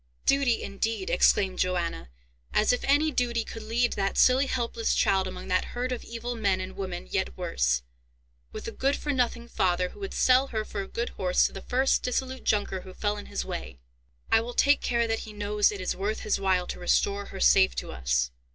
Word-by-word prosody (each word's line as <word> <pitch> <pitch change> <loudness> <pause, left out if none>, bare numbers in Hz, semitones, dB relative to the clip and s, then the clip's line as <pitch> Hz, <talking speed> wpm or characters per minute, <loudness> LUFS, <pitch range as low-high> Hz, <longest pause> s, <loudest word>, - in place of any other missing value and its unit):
"Duty, 275 -4 +2
indeed!" 200 0 -2
exclaimed 190 +1 +3
Johanna. 175 - -1 0.5
"As 215 +3 +4
if 245 - -2
any 295 +3 +3
duty 240 -3 0
could 225 - -8
lead 235 +3 0
that 195 -1 -1
silly 260 +2 +5
helpless 235 -3 -1
child 190 -1 +2
among 185 0 -7
that 185 0 +2
herd 250 +1 -2
of 250 - -3
evil 235 +1 -5
men, 200 -5 +1
and 185 0 -6
women 190 - -5
yet 65 -1 -1
worse, 60 -1 0 0.7
with - - -7
a - - -3
good 275 +2 0
for 295 - -3
nothing 245 -3 -1
father, 180 -4 +1
who - - -15
would 390 -1 -5
sell 255 +1 +4
her 220 -4 -3
for 200 - -4
a 195 - -6
good 235 +4 -3
horse 180 -1 +1
to - - -2
the 195 - -7
first 260 +5 +1
dissolute 260 +1 -3
Junker 205 -3 0
who 185 0 -12
fell 205 -1 -1
in 205 - -8
his 60 - -3
way." 65 +1 -6 0.5
"I 225 - +5
will 240 +1 -6
take 285 0 +4
care 235 -1 +1
that 225 0 -1
he 215 - -9
knows 210 0 +1
it 205 - -6
is 185 - -2
worth 205 +3 -2
his 215 - 0
while 190 -2 +1
to - - -6
restore 200 +3 +1
her - - -9
safe 60 -1 +5
to 60 - -4
us. - - 0
210 Hz, 215 wpm, -27 LUFS, 185-245 Hz, 0.7 s, silly